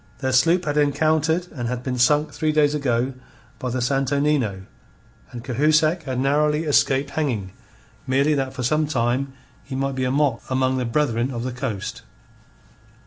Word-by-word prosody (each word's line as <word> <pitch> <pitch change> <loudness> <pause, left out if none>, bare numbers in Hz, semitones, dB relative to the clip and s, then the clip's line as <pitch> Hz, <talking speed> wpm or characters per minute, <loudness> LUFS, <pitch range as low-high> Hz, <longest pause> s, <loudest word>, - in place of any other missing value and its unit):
Their 130 -2 -2
sloop 165 +8 +3
had 145 0 -1
encountered 155 +3 +2
and 120 -5 -4
had 125 0 -3
been 125 -1 -3
sunk 150 +5 +3
three 155 -1 0
days 150 -1 +3
ago 130 -3 0 0.5
by 125 - -3
the 125 0 -2
Santo 135 +2 0
Nino, 130 -10 0 0.7
and 120 -1 -9
Cahusac 155 +5 +2
had 130 -2 -3
narrowly 150 +3 +2
escaped 140 -2 +2
hanging 120 -12 -2 0.6
merely 140 +4 +2
that 135 -2 -2
for 130 - -4
some 155 +5 +1
time 130 0 -1 0.3
he 135 - -7
might 135 +1 -1
be 130 -1 -1
a - - 0
mock 135 -3 +1
among 130 0 +1
the 125 - -1
Brethren 120 -1 0
of 120 -3 -4
the 130 - -3
Coast. 115 -3 -5
135 Hz, 170 wpm, -22 LUFS, 125-150 Hz, 0.7 s, sloop